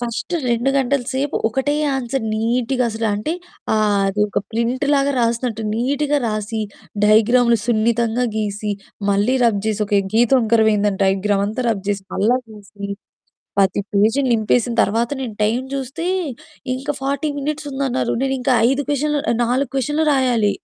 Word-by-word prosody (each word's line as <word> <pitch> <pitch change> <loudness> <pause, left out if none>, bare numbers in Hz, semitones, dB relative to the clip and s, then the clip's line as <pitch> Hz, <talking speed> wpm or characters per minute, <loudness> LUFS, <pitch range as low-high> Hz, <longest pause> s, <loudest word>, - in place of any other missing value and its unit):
First 240 +7 -4 0.2
2 240 +3 +1
గంటల 275 0 +1
సేపు 270 +2 -1
ఒకటే 265 +5 0 0.2
ఆన్సర్ 255 -1 -2
నీట్‌గా, 245 +3 0
అసలు 225 +1 -2
అంటే 210 +10 -2 0.4
ఆహ్, 210 -2 +2
అది 200 +2 -2
ఒక - - -1
ప్రింట్ 235 +4 0
లాగా 280 0 +2
రాసినట్టు 230 -1 -1
నీట్‌గా 285 +5 0
రాసి, 215 +1 -3 0.5
డైగ్రాములు 235 +2 +4
సున్నితంగా 235 +1 +1
గీసి, 210 -1 -2 0.4
మళ్ళీ 205 +6 +2
రబ్ 220 -4 +2
చేసి, 215 -1 -1
ఒక 205 - -1 0.2
గీత 235 +1 +4
వంకర 225 -2 +3
అయిందని 205 -1 0
డైగ్రామ్ 195 +1 +1
అంతా 220 +5 -3
రబ్ 200 -4 -2
చేసి 200 -1 -3
మళ్ళా 225 +5 +3
గీసి 200 -1 -9 0.7
10 195 +1 +2
పేజీలు 220 +7 +2
నింపేసిన 230 +2 +1
తర్వాత 230 +3 0
నేను 240 -5 -4
టైమ్ 230 +5 +1
జూస్తే 275 +4 -4 0.7
ఇంకా 270 +3 -3
40 280 +2 -1
మినిట్స్ 295 +1 -3
ఉందన్నారు. 265 -2 -1
నేను 270 0 0
ఇంకా 255 +1 +1 0.2
5 270 +2 0
క్వెషన్లు, 295 +1 0 0.2
4 250 +2 0
క్వెషన్లు 295 +4 0
రాయాలి. 245 -6 +2
235 Hz, 150 wpm, -20 LUFS, 215-265 Hz, 0.7 s, డైగ్రాములు